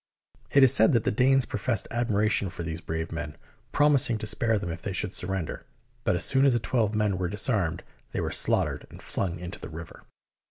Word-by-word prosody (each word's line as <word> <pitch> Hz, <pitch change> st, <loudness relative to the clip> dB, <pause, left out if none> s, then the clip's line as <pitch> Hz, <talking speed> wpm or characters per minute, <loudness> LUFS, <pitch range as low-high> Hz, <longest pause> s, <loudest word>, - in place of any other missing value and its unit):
It 140 Hz, -, +5 dB
is 130 Hz, -, +7 dB
said 110 Hz, -, +5 dB
that 115 Hz, -3 st, +2 dB
the -, -, +1 dB
Danes 130 Hz, +3 st, +3 dB
professed 110 Hz, +1 st, -1 dB
admiration 110 Hz, -4 st, +1 dB
for 85 Hz, -2 st, -7 dB
these 80 Hz, 0 st, -5 dB
brave 80 Hz, 0 st, -4 dB
men, 85 Hz, -3 st, -6 dB, 0.3 s
promising 140 Hz, -6 st, +3 dB
to 110 Hz, -, -5 dB
spare 110 Hz, +1 st, +1 dB
them 95 Hz, -4 st, -4 dB
if 85 Hz, +1 st, -7 dB
they 100 Hz, -, -4 dB
should 95 Hz, +1 st, -3 dB
surrender, 95 Hz, -4 st, -3 dB, 0.4 s
but -, -, +2 dB
as -, -, +1 dB
soon 135 Hz, -, +3 dB
as 140 Hz, -2 st, +5 dB
the 120 Hz, -, +2 dB
twelve 110 Hz, -2 st, 0 dB
men 105 Hz, -3 st, 0 dB
were 90 Hz, -2 st, -1 dB
disarmed, 100 Hz, -5 st, 0 dB, 0.3 s
they -, -, -3 dB
were -, -, -2 dB
slaughtered -, -, +1 dB
and -, -, -13 dB
flung 90 Hz, -3 st, -3 dB
into 90 Hz, +2 st, -8 dB
the -, -, -8 dB
river. 85 Hz, 0 st, -10 dB
105 Hz, 210 wpm, -27 LUFS, 85-120 Hz, 0.4 s, is